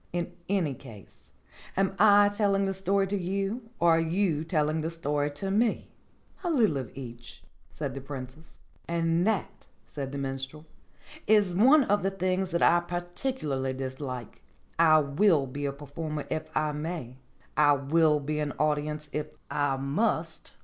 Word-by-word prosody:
In 175 0 -2 0.2
any 185 -8 +1
case, 115 -7 -14 0.5
am 195 0 +2
I 205 -1 +7
telling 200 -1 +1
the 195 - -1
story 195 +1 +1
to 195 +1 -2
you, 195 +5 -2
or 170 -1 +4
are - - +2
you 165 -1 +1
telling 155 -2 0
the 160 - -2
story 150 -3 -1
to 195 +7 -4
me 220 +3 +1 0.3
?" - - -31
"A 350 - -1
little 225 - +3
of 130 -5 -4
each," 120 -3 -9 0.3
said 140 -4 -4
the 135 - -6
Princess. 135 +2 -9 0.3
"And 170 +2 +1
that," 220 -5 -2 0.2
said 135 -2 -5
the 140 - -5
Minstrel, 135 +2 -5 0.6
"is 205 -4 +4
one 265 - +6
of 205 -3 +1
the 195 - +1
things 185 0 -1
that 170 -1 0
I 175 - +6
particularly 175 - -3
dislike. 130 -2 -6 0.4
I 160 -2 +7
will 150 +1 +3
be 145 +2 -5
a - - -1
performer 145 +2 -5
if 155 0 -3
I 155 0 +1
may. 150 -4 -5 0.4
I 145 -1 +5
will 150 +2 +3
be 150 +2 -3
an 150 -2 -2
audience 150 0 -1
if 150 0 -3 0.2
I 145 -2 +1
must. 160 +4 -1
160 Hz, 165 wpm, -28 LUFS, 145-195 Hz, 0.6 s, I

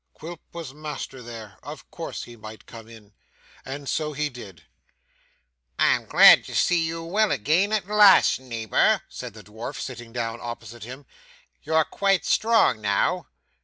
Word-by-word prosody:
Quilp 165 +1 -9
was 165 -6 -8
master 150 -3 -7
there. 110 -5 -10
Of - - -11
course - - -6
he 120 - -12
might 110 -2 -12
come 115 -1 -12
in.' 110 -3 -16 0.5
And 140 +1 -7
so 150 +1 -2
he 150 +1 -2
did. 100 - -12 1.1
'I'm - - +2
glad - - +8
to - - -8
see 175 -1 +3
you 165 +1 -4
well 210 +6 +1
again 160 - +1
at 215 -3 0
last, 210 -7 +6
neighbour,' 115 -5 +1
said - - -8
the - - -12
dwarf, 110 +6 -8
sitting 120 -3 -7
down 115 -1 -4
opposite 120 -1 -8
him. 130 +4 -10 0.6
'You're 160 -1 +1
quite 195 -2 0
strong 220 - +3
now? 100 -1 0
130 Hz, 155 wpm, -24 LUFS, 115-165 Hz, 1.1 s, glad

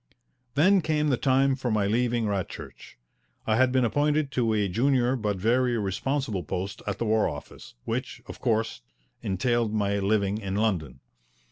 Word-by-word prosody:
Then 185 +6 +5
came 150 -1 +1
the 135 - +3
time 135 +1 +2
for 130 -2 -3
my 105 -3 +1
leaving 120 +2 +1
Radchurch. 100 -3 -5 0.5
I 110 - +2
had 130 0 +4
been 130 -1 +3
appointed 145 +3 +1
to 120 -4 +1
a 105 -2 +1
junior 125 +5 +2
but 105 -5 -2
very 120 +4 +2
responsible 110 +1 -2
post 95 +6 -4
at 100 - -2
the 115 - -2
War 110 0 +2
Office, 70 -4 -10
which, - - -3
of - - -10
course, 110 0 0 0.4
entailed 115 +2 0
my 100 -1 +1
living 100 0 +1
in 95 -2 -4
London. 85 - -1
115 Hz, 160 wpm, -26 LUFS, 100-130 Hz, 0.5 s, Then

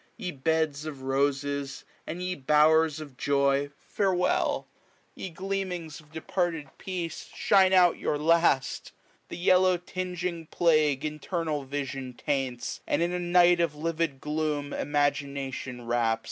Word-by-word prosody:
Ye 180 - -4
beds 155 +1 0
of 140 -4 -7
roses, 140 +1 -1 0.2
and 175 +3 -4
ye 180 0 -1
bowers 155 +1 +3
of 145 -5 -10
joy. 140 0 +2
Farewell! 185 -3 0 0.5
Ye 190 - -6
gleamings 180 -3 -4
of 155 -1 -19
departed 160 -2 -2
peace, 175 -4 -5
Shine 190 -2 +4
out 180 -2 +5
your 150 - 0
last! 160 -3 +2 0.4
the - - -6
yellow 185 +1 +4
tinging 180 -2 -4
plague 155 -6 +2
io8a - - -4
Internal 155 0 -3
vision 135 -2 -4
taints, 130 -2 -3
and - - +1
in 175 - 0
a 180 - -2
night 175 0 +4
Of 165 -3 +1
livid 160 -2 -2
gloom 150 -1 -2
imagination 140 -3 -2
wraps. 115 -1 +1
155 Hz, 130 wpm, -28 LUFS, 140-175 Hz, 0.5 s, out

